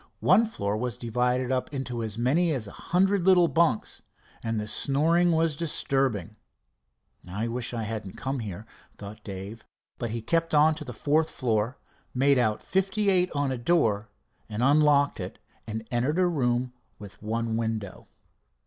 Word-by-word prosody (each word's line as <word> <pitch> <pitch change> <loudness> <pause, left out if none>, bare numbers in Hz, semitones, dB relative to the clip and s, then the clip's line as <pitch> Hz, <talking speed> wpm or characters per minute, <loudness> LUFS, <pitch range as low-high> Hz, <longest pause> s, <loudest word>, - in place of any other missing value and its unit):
One 230 +1 +5
floor 100 - -2
was 120 +1 -3
divided 125 +2 0
up 130 +1 -1
into 130 -4 -4
as 110 -1 -4
many 150 +9 +2
as 125 -6 -2
a - - -9
hundred 190 +2 +1
little 180 -2 +5
bunks, 150 -6 +1 0.4
and 115 -1 -2
the 105 - -4
snoring 165 +9 +2
was 165 -2 +2
disturbing. 135 - -1 0.9
"I 105 +5 -2
wish 120 +1 -2
I 115 -2 -3
hadn't 110 -3 -5
come 135 0 -3
here," 105 -2 -6 0.3
thought 105 +1 -10
Dave, 100 +3 -7 0.4
but 120 - -2
he 115 0 -4
kept 165 +4 +1
on 155 +2 +5
to 150 - -7
the 130 - -7
fourth 150 +7 +1
floor, 115 0 -1 0.4
made 135 +1 +4
out 110 -3 +1
58 190 -1 +1
on 145 -2 0
a 130 - -3
door, 115 -7 +1 0.4
and 110 +2 -2
unlocked 145 0 +4
it - - -6 0.3
and 110 0 -5
entered 130 +7 0
a 185 - +4
room 125 -6 0 0.2
with 100 -2 -12
one 115 +1 -2
window. 110 -4 -3
125 Hz, 160 wpm, -27 LUFS, 110-155 Hz, 0.9 s, One